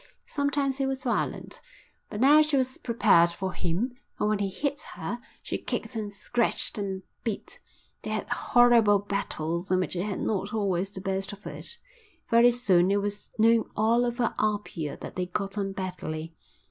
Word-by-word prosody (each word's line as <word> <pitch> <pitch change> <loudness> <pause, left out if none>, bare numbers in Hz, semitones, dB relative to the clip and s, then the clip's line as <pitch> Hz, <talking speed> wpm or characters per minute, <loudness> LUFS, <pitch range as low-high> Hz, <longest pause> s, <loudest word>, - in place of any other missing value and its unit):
Sometimes 285 -2 0
he 270 - +2
was 270 -1 -3
violent, 245 - -2 0.5
but 210 - -5
now 290 +5 +7
she 305 -2 +2
was 260 -1 0
prepared 205 -8 +4
for 185 +2 -4
him, 195 +10 -1 0.3
and 210 - +2
when 215 -1 +1
he 200 -1 0
hit 280 +8 -2
her 240 - -4 0.2
she - - -3
kicked - - -4
and 210 -2 -3
scratched 220 +2 0
and 190 -2 -3 0.2
bit. 225 -4 -4 0.4
They - - -5
had - - -2
horrible 235 -4 +5
battles 190 -4 -3
in 185 0 +3
which 185 - -1
he 175 - -1
had 200 0 -2
not 210 +1 -1
always 195 -3 0
the 190 -2 -8
best 195 +1 -2
of 205 +1 -13
it. 470 - -6 0.5
Very 235 +1 +7
soon 195 -7 +3
it 200 - +3
was 205 0 -4
known 225 0 +4
all 230 +3 +3
over 240 -1 0
Apia 205 -8 -1
that - - -8
they 180 -1 -1
got 195 +2 -3
on 200 -2 -1
badly. 165 -4 -5
205 Hz, 175 wpm, -27 LUFS, 190-240 Hz, 0.5 s, now